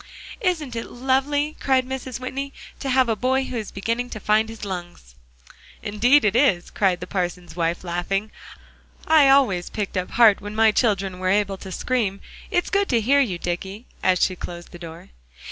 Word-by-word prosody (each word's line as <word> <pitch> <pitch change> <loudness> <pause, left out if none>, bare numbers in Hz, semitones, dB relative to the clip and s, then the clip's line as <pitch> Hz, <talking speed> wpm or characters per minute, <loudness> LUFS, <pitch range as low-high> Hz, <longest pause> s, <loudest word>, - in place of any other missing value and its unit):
"Isn't 325 - -1
it 230 - -5
lovely," 270 +4 0
cried 260 -2 +2
Mrs. 260 -1 -5
Whitney, 270 +2 -5 0.3
"to 275 - -3
have 260 -1 +3
a 225 - +1
boy 260 +4 +1
who 255 - -6
is 220 -3 -4
beginning 230 +5 -2
to 215 - -6
find 215 +1 +2
his 225 -2 -8
lungs?" 175 - -7 0.7
"Indeed 240 +6 +3
it 210 +1 +2
is," 220 -10 +2
cried 185 -3 +1
the - - -4
parson's 180 -2 -4
wife, 170 0 -1
laughing; 185 +4 -2 0.7
"I 310 -3 +6
always 215 -11 +3
picked 205 -2 -4
up 185 - -2
heart 225 -4 +5
when 205 +1 -7
my 220 0 +5
children 195 -5 0
were 185 0 0
able 200 0 +1
to 190 0 -9
scream. 205 -2 -1 0.3
It's 355 - 0
good 400 0 +1
to 235 - +3
hear 265 +6 +3
you, 215 -11 +1
Dicky," 190 +6 -5 0.2
as 185 -1 +3
she 185 - +2
closed 175 -1 -8
the 175 - -11
door. 165 -1 -10
215 Hz, 185 wpm, -23 LUFS, 185-260 Hz, 0.7 s, I